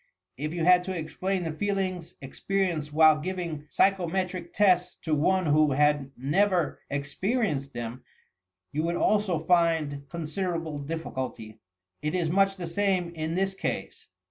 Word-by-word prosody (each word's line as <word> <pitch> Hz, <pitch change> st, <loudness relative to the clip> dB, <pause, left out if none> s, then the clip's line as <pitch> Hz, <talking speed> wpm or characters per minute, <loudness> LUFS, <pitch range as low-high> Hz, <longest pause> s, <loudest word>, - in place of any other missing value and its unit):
If 150 Hz, +4 st, -4 dB
you 170 Hz, -1 st, -2 dB
had 180 Hz, 0 st, +6 dB
to 190 Hz, -1 st, -3 dB
explain 180 Hz, +4 st, -2 dB
the 165 Hz, -, -2 dB
feelings 185 Hz, -1 st, -2 dB
experienced 165 Hz, +1 st, -2 dB
while 155 Hz, 0 st, +6 dB
giving 170 Hz, -3 st, -4 dB
psychometric 185 Hz, -1 st, 0 dB
tests 180 Hz, -3 st, +3 dB
to 160 Hz, -, -1 dB
one 185 Hz, +5 st, +2 dB
who 150 Hz, -1 st, +4 dB
had 145 Hz, -1 st, +2 dB
never 175 Hz, +6 st, +1 dB
experienced 145 Hz, -, -1 dB
them, 120 Hz, +2 st, -6 dB, 0.7 s
you 150 Hz, -, -1 dB
would 170 Hz, +2 st, -1 dB
also 205 Hz, -4 st, +2 dB
find 160 Hz, -4 st, +1 dB
con 170 Hz, -1 st, -5 dB
siderable 165 Hz, -3 st, -3 dB
difficulty. 130 Hz, -9 st, -5 dB, 0.4 s
It 150 Hz, +3 st, -1 dB
is 170 Hz, -3 st, 0 dB
much 195 Hz, +1 st, +3 dB
the 180 Hz, -2 st, -5 dB
same 185 Hz, 0 st, 0 dB
in 160 Hz, 0 st, -3 dB
this 195 Hz, +1 st, 0 dB
case. 190 Hz, -, -4 dB
170 Hz, 145 wpm, -27 LUFS, 150-185 Hz, 0.7 s, had